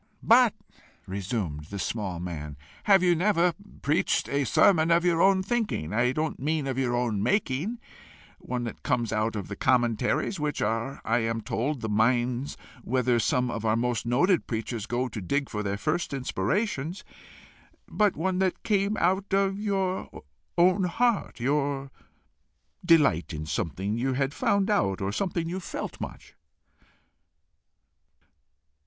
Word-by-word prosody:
"But," - - +5 0.5
resumed 95 -6 -3
the 100 +6 -7
small 95 -3 -3
man, 75 -5 -6 0.3
"have 195 -3 +5
you 175 -1 +5
never 175 0 +2 0.3
preached 145 +3 +1
a 140 0 0
sermon 160 - +4
of 170 +1 +3
your 170 -1 +3
own 190 -1 +4
thinking 205 - -2
I 120 +3 +2
don't 155 +3 -2
mean 150 +1 -1
of 135 -1 -2
your 120 -2 0
own 120 -5 0
making 200 - 0 0.6
one 125 -1 -4
that 115 - -6
came 120 - 0
out 110 +1 0
of 100 -3 -4
the 100 - -6
commentaries, 120 - +1
which 150 -1 -2
are, 115 +5 -2
I 115 +2 +2
am 115 0 -1
told, 125 +6 -2
the 110 - -2
mines 120 +4 +1 0.3
whither 125 -1 +1
some 125 +1 +1
of 115 - -4
our 110 0 +2
most 120 -1 -1
noted 170 +10 +2
preachers 115 -1 -3
go 125 +2 -1
to 110 -4 -6
dig 140 +9 -1
for 105 - -2
their 100 -1 -2
first 155 +5 -1
inspirations 140 - -2 0.8
but 210 -3 +1
one 185 +3 0
that 190 -1 0
came 205 0 +1
out 190 +2 +1
of 195 0 +1
your 195 -3 -2 0.3
own 185 +2 +4
heart 230 - 0
your 140 +1 -1 0.9
delight 150 - +3
in 75 0 -5
something 90 +8 -2
you 130 +2 0
had 135 +1 -1
found 200 +1 +1
out, 100 - +1
or 95 0 -2
something 170 - -2
you 180 +3 -3
felt 180 - -6
much?" - - -8
135 Hz, 150 wpm, -27 LUFS, 110-180 Hz, 0.9 s, But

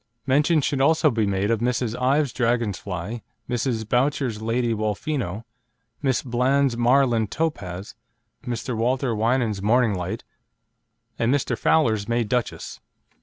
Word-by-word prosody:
Mention 150 +4 +3
should 135 0 0
also 155 +1 +4
be 110 -3 0
made 100 +2 0
of 115 -1 0
Miss 120 0 +1
Ives' 130 +3 +1
Dragon 120 -3 +1
Fly, 100 +5 -5 0.3
Mrs. 120 -2 -1
Boutcher's 125 -2 0
Lady 115 +1 0
Wolfino, 110 - -2 0.6
Miss 135 -4 +1
Bland's 130 +1 +1
Marland 120 -2 +3
Topaz, 100 - -3 0.5
Mr. 125 -1 -3
Walter 125 +2 0
Winans' 110 -2 0
Morning 115 +1 +3
Light, 90 -2 -4 1.0
and 115 +1 +2
Mr. 130 -3 +1
Fowler's 110 -8 +2
May 120 0 +1
Duchess. 120 +2 -3
120 Hz, 125 wpm, -24 LUFS, 110-130 Hz, 1.0 s, also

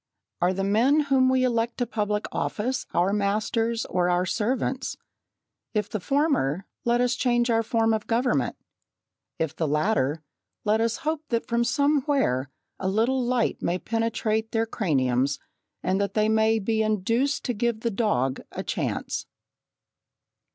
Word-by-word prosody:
Are 175 +1 +3
the 195 +1 -2
men 230 +9 +3
whom 270 -3 +3
we 260 0 +3
elect 235 -1 0
to 245 - 0
public 210 -3 -1
office 245 +4 -2
our 180 +3 +2
masters 220 +3 0
or 180 -1 0
our 180 +1 +2
servants? 255 +6 -1 0.8
If 210 -1 -1
the 215 - -2
former, 245 - +1 0.2
let 240 +1 +2
us 250 0 +2
change 240 -1 +1
our 225 0 +3
form 225 0 +1
of 215 -1 -2
government; 230 - +1 0.8
if 160 -2 -2
the 160 - -1
latter, 150 -1 +1 0.4
let 215 +1 +3
us 230 0 0
hope 315 0 -1
that 230 -1 0
from 235 0 +1
somewhere 280 - +1 0.3
a 190 - -2
little 235 +6 +1
light 245 -1 0
may 175 - 0
penetrate 225 0 -1
their 225 0 +2
craniums 140 - +1 0.5
and 190 +2 +1
that 200 - -2
they 215 0 +3
may 220 0 +3
be 220 +1 0
induced 230 +6 0
to 245 - 0
give 230 0 -1
the 235 - 0
dog 165 - 0
a - - -5
chance. - - -3
225 Hz, 150 wpm, -26 LUFS, 195-240 Hz, 0.8 s, Are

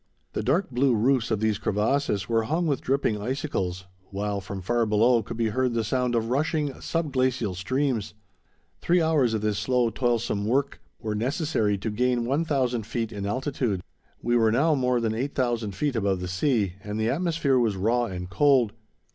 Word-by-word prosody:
The - - -1
dark 160 +5 +1
blue 125 0 +2
roofs 125 +2 +2
of 110 -2 0
these 110 -2 +1
crevasses 105 -1 0
were 115 -1 +1
hung 165 +8 0
with 145 -5 0
dripping 130 -6 0
icicles, 100 -8 -3 0.2
while 100 0 -2
from 100 0 -6
far 120 +3 +1
below 115 +3 +4
could 110 - -7
be 115 -1 +1
heard 125 +2 0
the 115 - +1
sound 125 +2 0
of 115 0 0
rushing, 150 +1 0
sub 165 -3 -2
glacial 130 -6 +1
streams. 120 +3 -1 0.7
Three 175 +1 +3
hours 150 -8 +2
of 110 - -2
this 105 -1 0
slow, 120 +1 +1
toilsome 120 -5 0
work 135 +4 0 0.2
were 110 -2 -2
necessary 115 - 0
to 105 +3 -3
gain 125 +2 +1
1000 135 -3 0
feet 115 +1 -3
in 100 -2 -4
altitude. 125 -5 -1 0.4
We 120 0 +1
were 115 -2 +4
now 145 +7 +3
more 125 -3 +1
than 115 -2 0
8000 120 -4 -1
feet 145 +3 -1
above 100 -4 0
the 90 - -4
sea, 100 - +1
and 105 +1 -4
the 110 +1 +1
atmosphere 160 -4 +1
was 110 -4 +1
raw 120 +5 +1
and 90 -4 -5
cold. 125 +1 +3
120 Hz, 180 wpm, -26 LUFS, 105-135 Hz, 0.7 s, below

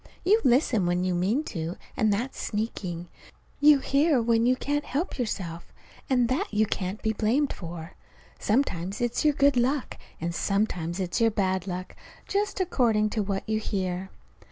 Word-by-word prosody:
You 425 +5 +5
listen 240 - +3
when 175 +1 +1
you 185 -1 0
mean 195 - +1
to, 165 0 -4 0.2
and 215 -1 +2
that's 235 +7 -2
sneaking. 185 -5 -3 0.5
You 295 0 +7
hear 275 +1 +2
when 230 0 +2
you 255 - +4
can't 290 +3 -1
help 290 +3 -3
yourself, 175 -8 -4 0.4
and 250 -3 +3
that 285 - -1
you 215 +1 +3
can't 195 0 -3
be 220 -1 +1
blamed 240 +7 +1
for. 170 -1 -8 0.5
Sometimes 200 -5 0
it's 240 -1 0
your 300 -2 +3
good 280 -1 +4
luck, 260 +3 0 0.2
and 170 +1 -2
sometimes 180 -3 -1
it's 180 +2 -1
your 225 - +5
bad 190 -3 -1
luck 185 0 -5 0.3
just 405 0 -1
according 230 - +2
to 215 - 0
what 195 -1 -3
you 215 0 +1
hear! 190 -3 -3
215 Hz, 165 wpm, -27 LUFS, 185-260 Hz, 0.5 s, You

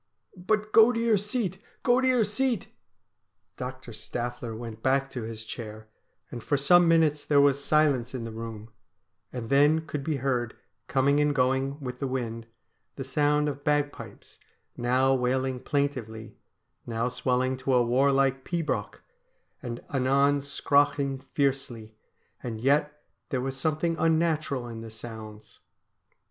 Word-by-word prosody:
' - - -29
But 215 0 +1
go 225 +2 +7
to 230 - -2
your 230 -3 +3
seat! 205 -3 -2 0.2
go 245 +1 +4
to 260 - +2
your 250 -3 +4
seat! 225 +1 -1 0.4
' - - -52
Dr. 130 -1 -8
Staffler 120 +1 -5
went 115 -1 -8
back 135 +2 +1
to 125 - -5
his 110 0 -7
chair, 110 -1 -8 0.4
and 120 - -7
for 145 - +1
some 175 +5 +5
minutes 160 -3 +3
there 145 -1 +3
was 140 0 +3
silence 140 -6 +2
in 120 - -4
the 115 - -6
room; 110 -1 -8 0.6
and 125 -1 -6
then 150 +3 +4
could 150 -2 -4
be 155 +1 -1
heard, 125 -4 -1 0.3
coming 140 +2 +2
and 150 -1 +2
going, 135 +2 +1
with 125 -3 -6
the 135 - -2
wind, 115 -3 -4 0.5
the 135 - -5
sound 150 +2 +1
of 145 -1 -4
bagpipes, 145 -1 -3 0.4
now 130 +2 +2
wailing 130 0 0
plaintively, 125 -6 -3 0.5
now 115 +1 -1
swelling 125 +1 0
to 130 0 0
a 120 -1 +4
warlike 135 +1 +2
pibroch, 170 -3 -3 0.6
and 120 -4 -6
anon 140 +2 +3
scraughing 140 -1 +1
fiercely; 130 -7 -2 0.5
and 115 -3 -5
yet 150 +4 +1 0.3
there 130 - -1
was 135 +1 -3
something 155 +4 0
un 165 -1 +3
natural 155 -6 -1
in 115 -1 -7
the 115 - -8
sounds. 110 -1 -10
135 Hz, 150 wpm, -27 LUFS, 120-150 Hz, 0.6 s, go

